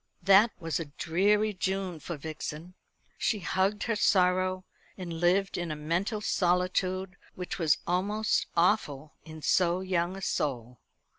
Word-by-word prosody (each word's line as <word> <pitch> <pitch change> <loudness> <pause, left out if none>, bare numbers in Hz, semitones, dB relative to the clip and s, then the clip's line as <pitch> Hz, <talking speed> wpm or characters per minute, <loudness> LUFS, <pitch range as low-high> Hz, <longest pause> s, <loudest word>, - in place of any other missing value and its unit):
That 200 +4 +6
was 165 -2 -2
a 165 - -4
dreary 200 +8 +1
June 190 -2 -2
for 170 +2 -6
Vixen. 155 +3 -7 0.5
She 220 - +1
hugged 190 +4 0
her 230 - 0
sorrow, 185 -1 +2 0.3
and 180 -3 -6
lived 185 +3 +2
in 175 -1 -3
a 155 - -3
mental 175 +8 -2
solitude 185 0 0 0.2
which 180 +1 -5
was 160 -4 +3
almost 205 +5 0
awful 155 -6 +1
in 155 -1 -10
so 180 0 +2
young 185 -1 -1
a - - -8
soul. 125 -7 -2
180 Hz, 140 wpm, -29 LUFS, 165-195 Hz, 0.5 s, That